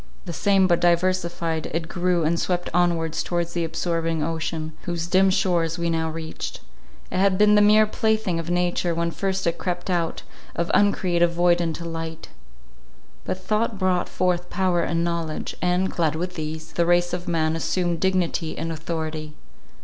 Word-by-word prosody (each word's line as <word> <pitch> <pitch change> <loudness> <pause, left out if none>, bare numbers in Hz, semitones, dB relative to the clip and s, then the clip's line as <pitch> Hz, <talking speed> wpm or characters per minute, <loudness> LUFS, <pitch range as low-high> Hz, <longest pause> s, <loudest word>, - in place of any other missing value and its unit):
The 170 - -5
same, 195 +1 +3
but 175 -2 +3
diversified, 170 -2 +1
it 165 +1 -3
grew, 180 -1 0
and 165 +2 +1
swept 180 -1 -1
onwards 170 -2 +1
towards 170 -1 -2
the 170 - -1
absorbing 165 -1 -1
ocean, 160 0 -3
whose 170 -2 -2
dim 190 +2 +4
shores 175 -4 +1
we 170 -1 0
now 160 0 0
reached. 160 0 -6 0.5
It - - -1
had 195 -1 +3
been 210 +1 +5
the 210 - +6
mere 215 +1 +6
plaything 215 -4 0
of 165 0 -5
nature, 175 -1 0
when 170 0 0
first 190 +1 -2
it 170 0 0
crept 180 0 -3
out 170 -2 -1 0.3
of 170 0 -1
uncreative 175 -4 +3
void 175 0 +3
into 170 0 -3
light; 165 -1 -6 1.0
but - - -2
thought 215 +1 0
brought 185 -2 +1
forth 180 -1 0
power 185 -3 +1
and 170 0 0
knowledge; 170 -2 -3
and, 180 +1 +1
clad 160 -3 0
with 180 +3 -3
these, 160 0 -5
the 170 -1 +1
race 175 0 +3
of 180 0 -4
man 160 -2 +1
assumed 175 0 -1
dignity 180 -3 0
and 165 - -3
authority. 155 -1 -4
170 Hz, 170 wpm, -24 LUFS, 165-180 Hz, 1.0 s, the